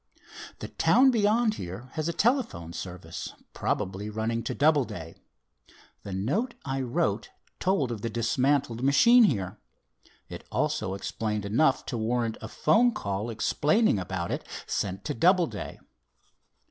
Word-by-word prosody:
"The - - -7
town 265 +1 +4
beyond 220 0 +3
here 95 +9 -7
has 155 0 -2
a - - +1
telephone 215 - 0
service 90 -1 -7 0.2
probably, 95 +3 -2
running 110 +2 -2
to - - -2
Doubleday. 125 - +1 0.9
The 100 - -8
note 145 - -1
I 135 0 -2
wrote 110 -4 -1 0.3
told 180 -10 +1
of 110 -3 -5
the 115 - -2
dismantled 120 +2 +1
machine 230 - +6
here. 100 - -1 0.7
It - - -8
also 95 - -1
explained 105 +1 -3
enough 130 +7 +2
to 120 - -3
warrant 115 0 -1
a 110 - -5
'phone 225 - +3
call, 100 +3 -3
explaining 145 - +2
about 90 -1 -3
it, - - -3 0.2
sent 95 0 -3
to - - -1
Doubleday. 170 - +1
120 Hz, 135 wpm, -27 LUFS, 100-165 Hz, 0.9 s, machine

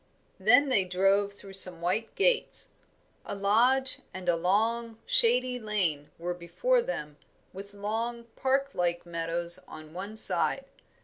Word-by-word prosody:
Then 245 +8 +4
they 210 -7 +3
drove 195 +2 +1
through 200 -1 -13
some 185 -3 +4
white 185 +7 -2
gates. 475 +3 +2 0.5
A - - -6
lodge 245 +7 +2 0.2
and 185 -1 -8
a 175 - +3
long, 225 +6 0
shady 250 +2 +2
lane 185 -10 -2
were 175 +1 -4
before 475 - 0
them, 150 - -6 0.4
with 200 +2 -10
long, 225 +4 -4
parklike 260 -11 -1
meadows 170 +1 0
on 155 0 -12
one 200 +4 -7
side. 210 +6 +3
200 Hz, 130 wpm, -28 LUFS, 175-235 Hz, 0.5 s, Then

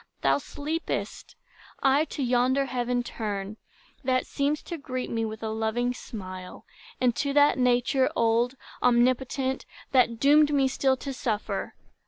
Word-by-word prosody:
Thou 135 0 +3
sleepest; 310 - -4 0.5
I 275 +3 +4
to 290 - -4
yonder 255 +2 +2
heaven 245 -1 -1
turn, 210 -3 -4 0.5
That 255 0 +1
seems 285 +2 -1
to 340 - -6
greet 255 -2 -4
me 225 -1 0
with 220 0 -6
a 220 - -2
loving 220 +3 0
smile, 185 -7 -8 0.3
And 245 -2 +2
to 280 -1 0
that 290 -1 +4
Nature 250 +1 +3
old, 235 +2 +2 0.3
omnipotent, 255 +2 +1 0.2
That 240 -3 +3
doomed 295 +2 +5
me 270 -1 +4
still 265 0 +1
to 275 +1 -5
suffer. 220 -4 -3
250 Hz, 140 wpm, -27 LUFS, 230-275 Hz, 0.5 s, doomed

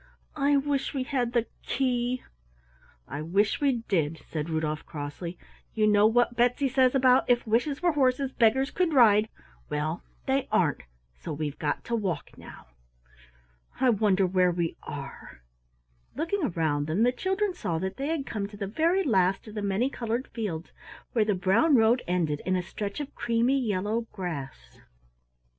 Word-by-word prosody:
I 285 -1 +3
wish 280 0 -1
we 265 - 0
had 250 -2 -1
the 235 -2 +2 0.2
key!" 250 -1 -1 0.8
"I 145 +3 -5
wish 195 - +1
we 265 -5 +1
did," 165 -4 0
said 155 0 -4
Rudolf 155 -1 -2
crossly. 160 +3 -6 0.4
"You 215 -1 +3
know 210 0 +5
what 240 +1 +2
Betsy 245 +3 +2
says 255 0 +3
about 260 -1 +4
'If 245 -1 +3
wishes 245 +8 0
were 350 - +4
horses, 270 -2 +1
beggars 265 +4 +2
could 355 -3 0
ride' 220 -3 +6 0.4
well, 155 +3 -2 0.2
they 270 0 0
aren't, 180 -8 +2 0.3
so - - -8
we've 150 -1 -4
got 150 -2 -2
to 235 - -2
walk 190 -9 -3
now. - - -12 1.1
I 255 -1 +4
wonder 200 -3 +2
where 185 0 +3
we 170 -1 -1
are?" - - -9 0.7
Looking 330 +4 -1
around 155 - 0
them, 170 +8 +1
the 245 - +4
children 385 +7 -1
saw 185 - -3
that 190 +3 -4
they 275 - -2
had 315 -3 -1
come 205 -6 -3
to 205 0 -12
the 200 - -3
very 330 - +1
last 195 - +1
of 215 - -9
the 210 - -4
many 200 +5 +1
colored 235 +1 -3
fields, 195 -8 -5 0.4
where 225 -3 +3
the 210 -2 +1
brown 195 - +3
road 230 +1 +4
ended 165 -5 0
in 185 - 0
a 180 - -1
stretch 200 +5 -5
of 285 - -7
creamy 240 +4 +1
yellow 220 0 -1
grass. 140 - -7
220 Hz, 165 wpm, -27 LUFS, 180-260 Hz, 1.1 s, ride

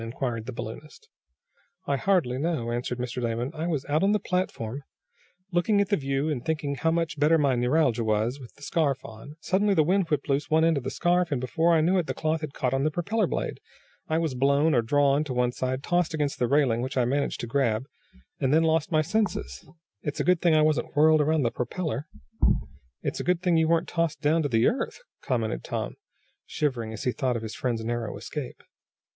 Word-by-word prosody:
inquired 115 -1 -4
the - - -3
balloonist. 120 +6 -9 0.8
"I 140 - +1
hardly 140 -7 +1
know," 145 -7 -1
answered 120 +1 -2
Mr. 125 0 -4
Damon. 120 +3 -2
"I 160 +1 -3
was 150 -6 -1
out 150 +2 +1
on 200 +2 +3
the 210 - +2
platform, 145 - -2 0.7
looking 185 +4 +2
at 200 -1 +1
the 205 - +3
view, 135 -1 -1
and 145 -6 -2
thinking 155 -3 -1
how 140 +4 0
much 165 -2 -1
better 155 +3 +5
my 140 -3 +2
neuralgia 125 -1 +2
was, 110 +5 0
with 125 -3 -11
the 145 - -16
scarf 140 -4 0
on. 115 +7 -10
Suddenly 200 +1 +2
the 155 - +5
wind 185 +2 +1
whipped 150 -2 -1
loose 140 0 0
one 160 +1 +4
end 165 -1 +3
of 135 - -3
the 130 - -2
scarf, 175 +2 +1
and, 140 - 0
before 165 +7 +2
I 160 - +4
knew 180 +4 +3
it 170 - -2
the - - -3
cloth 155 0 -1
had 155 - -4
caught 125 -2 -1
on 135 0 +1
the 155 - +3
propeller 190 +6 0
blade. - - -3 0.5
I 160 - +1
was 160 -4 0
blown, 140 +4 +3
or 120 - +4
drawn 140 +4 +2
to 130 -4 -4
one 125 0 +2
side, 130 +2 -3
tossed 175 -1 +1
against 145 -2 -1
the 125 - +2
railing, 130 -4 +2
which 130 +1 -4
I 125 - +3
managed 140 +3 -1
to - - -3
grab, 115 -2 0 0.5
and 135 -1 +1
then 160 +2 +4
I - - +2
lost 160 0 +1
my 155 -1 +3
senses. 170 - -2 0.3
It's 145 - -4
a - - +1
good 180 -2 +3
thing 170 -3 +4
I 155 - +5
wasn't 150 -5 0
whirled 155 +1 +5
around 155 0 +2
the 115 - +1
propeller." 150 +3 -3 1.0
"It's - - -2
a - - -2
good 180 0 0
thing 175 -3 +3
you 160 0 +3
weren't 165 0 +2
tossed 165 -2 -1
down 160 +2 +2
to 145 - -1
the 115 -1 +3
earth," 260 - 0 0.2
commented - - -2
Tom, - - -3 0.5
shivering 125 -7 -2
as 110 - -6
he 125 - +1
thought 130 -1 -1
of 115 - -6
his 110 - -5
friend's 120 -7 -2
narrow 120 -2 -3
escape. 130 +5 -7
145 Hz, 225 wpm, -26 LUFS, 125-165 Hz, 1.0 s, better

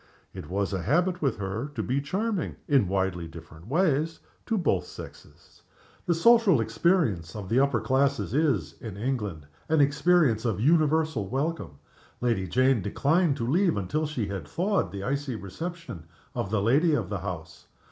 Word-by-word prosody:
It 75 - -8
was 100 +2 -1
a 95 - -1
habit 175 - +1
with 135 -6 0
her 105 +8 -4
to 110 - -2
be 130 +5 0
charming 190 +6 -2
(in 135 -9 +3
widely 95 -3 -1
different 80 +1 -12
ways) 160 +1 +1 0.3
to 225 - +1
both 175 -8 0
sexes. - - -13 0.5
The 170 - +3
social 220 - +5
experience 115 - +1
of 100 -3 -6
the 120 - +3
upper 140 -3 +2
classes 140 +3 +1
is, 150 +1 0
in 110 -5 -7
England, 105 - -3 0.2
an 160 -1 +3
experience 145 -4 +3
of 110 -5 -1
universal 155 - +2
welcome. 140 - -3 0.4
Lady 115 -6 0
Jane 130 +4 +3
declined 145 - +1
to 115 - -2
leave 175 - +2
until 150 +11 -1
she 130 -8 -2
had 95 -7 -5
thawed 190 - 0
the 100 -1 -6
icy 140 +1 -2
reception 110 - -7 0.3
of 95 - -3
the 100 -1 0
lady 150 +8 +3
of 105 -9 -2
the 100 - -2
house. 90 -4 -7
130 Hz, 165 wpm, -27 LUFS, 100-160 Hz, 0.5 s, social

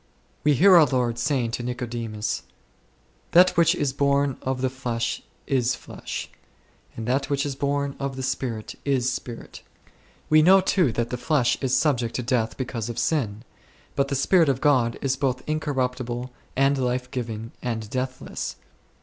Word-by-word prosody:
We 150 -1 +4
hear 185 +6 +7
our 155 -3 +7
Lord 120 -2 0
saying 125 -3 0
to 120 - -3
Nicodemus, 120 -3 -3 0.9
"That 180 +2 +7
which 170 0 +4
is 140 -5 -1
born 140 -1 +1
of 130 -1 -2
the 130 - +1
flesh 120 -3 -2 0.2
is 125 -3 +1
flesh; - - -7 0.7
and 115 - -4
that 135 +3 0
which 140 0 0
is 145 - -2
born 140 0 -1
of 135 -1 -3
the 130 - -5
Spirit 115 -4 -3
is 135 -3 +1
spirit6." 120 -2 -7 0.7
We 155 0 +6
know 190 +5 +7
too 185 -6 +2
that 120 0 -2
the 125 - -2
flesh 125 -1 +2
is 130 -1 +2
subject 125 -6 +1
to 125 - -1
death 115 -2 0
because 120 -3 -3
of 120 - -5
sin, 120 -6 0 0.5
.but 140 0 +2
the 140 - -2
Spirit 160 +4 +4
of 130 -2 +1
God 130 -6 +3
is 135 -1 +1
both 130 -2 -1
incorruptible, 130 -5 -2 0.2
and 135 +1 +3
life 125 0 -1
giving, 115 -2 -4
and 110 -3 -3
deathless. 130 +2 -4
130 Hz, 165 wpm, -25 LUFS, 120-140 Hz, 0.9 s, hear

